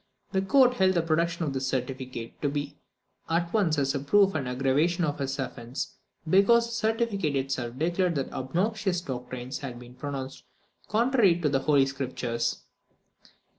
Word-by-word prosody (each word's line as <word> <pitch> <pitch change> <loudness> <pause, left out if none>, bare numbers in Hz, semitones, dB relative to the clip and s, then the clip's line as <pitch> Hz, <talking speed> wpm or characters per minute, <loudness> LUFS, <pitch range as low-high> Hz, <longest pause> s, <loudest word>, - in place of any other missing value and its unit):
The 190 - +1
court 250 +5 +4
held 190 -1 +3
the 170 - +2
production 170 +1 0
of 140 - -2
this 130 0 -2
certificate 130 -2 -4
to 145 - +1
be 145 0 -4 0.5
at 170 +1 0
once 185 -8 +2 0.2
a 140 - -1
proof 195 +8 +4
and 140 -5 -2
an 125 - -3
aggravation 150 +7 +2
of 145 -2 -1
his 135 0 -2
offence, 125 -1 -5 0.3
because 200 +7 +5
the 235 - -8
certificate 220 -8 0
itself 130 -3 -2
declared 175 +3 +1
that 135 -2 -2
the - - -9
obnoxious 185 - 0
doctrines 125 -2 -5
had 130 -4 -6
been 125 0 -12
pronounced 135 0 -6 0.4
contrary 220 -5 +3
to 150 - +2
the 135 -1 +2
Holy 140 0 +4
Scriptures. 125 -4 -3
145 Hz, 165 wpm, -27 LUFS, 130-190 Hz, 0.5 s, because